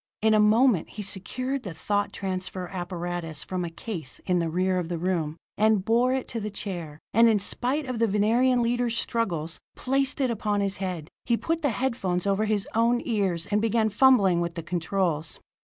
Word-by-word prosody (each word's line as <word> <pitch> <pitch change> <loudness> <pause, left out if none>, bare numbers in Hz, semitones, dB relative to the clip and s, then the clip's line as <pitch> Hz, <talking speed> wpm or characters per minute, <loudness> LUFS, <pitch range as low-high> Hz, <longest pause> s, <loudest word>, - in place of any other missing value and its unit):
In 220 0 +5
a 215 - +5
moment 215 -2 +4
he 210 - -6
secured 255 +8 -3
the 185 -7 -7
thought 205 +5 -1
transference 185 -1 -4
apparatus 175 -4 -4
from 185 -1 -3
a 170 - -3
case 165 - -6
in 180 -1 +2
the 165 -1 0
rear 185 +2 +1
of 170 -2 -4
the 175 - -2
room, 165 -3 -1 0.2
and 215 -3 +3
bore 240 +3 +3
it 260 0 -1
to 230 - -3
the 210 0 -3
chair, 175 -7 -5 0.2
and 230 +2 +6
in 220 - +4
spite 255 +8 -1
of 255 -3 -4
the 230 - +3
Venerian 235 +5 +3
leader's 240 0 +1
struggles, 170 -10 -1 0.2
placed 270 +2 0
it 260 -3 +2
upon 210 -2 -1
his 200 0 0
head. 180 -5 -4 0.2
He 235 -1 +2
put 330 +5 -1
the 290 - +2
head 250 +2 -1
phones 180 -5 -1
over 200 +2 +1
his 210 -2 0
own 235 +2 +3
ears, 195 -8 0
and 210 +1 +2
began 225 0 +2
fumbling 205 -6 +4
with 170 -1 -3
the 165 - -5
controls. 170 -2 -1
205 Hz, 200 wpm, -26 LUFS, 180-230 Hz, 0.2 s, and